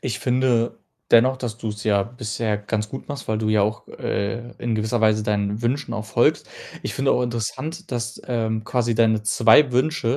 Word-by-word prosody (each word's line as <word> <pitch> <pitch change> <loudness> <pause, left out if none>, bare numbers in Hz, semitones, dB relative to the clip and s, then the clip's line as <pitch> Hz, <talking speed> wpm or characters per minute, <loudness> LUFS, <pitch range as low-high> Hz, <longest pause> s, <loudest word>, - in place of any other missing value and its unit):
ich 120 -6 -3
finde 125 -2 +1 0.3
dennoch, 130 +3 +5
dass 120 -3 -5
du's 105 -2 -5
ja 100 -2 +3
bisher 110 -2 -3
ganz 105 0 -3
gut 135 - -8
machst, 145 -5 -6
weil 110 -1 0
du 110 -1 -1
ja 105 -2 +3
auch, 105 +1 -2
äh, 115 +4 -3
in 120 -2 -1
gewisser 110 +2 -1
Weise 110 -1 +3
deinen 105 0 -1
Wünschen 135 +4 -1
auch 110 -1 -4
folgst. - - +2 0.3
Ich - - -4
finde 135 0 +2
auch 125 - +1
interessant, 145 - -4
dass, 120 0 -4
ähm, 110 -3 -1
quasi 120 -1 0
deine 110 -1 +3
2 115 +6 +5
Wünsche, 130 -1 +1
115 Hz, 190 wpm, -23 LUFS, 110-125 Hz, 0.3 s, dennoch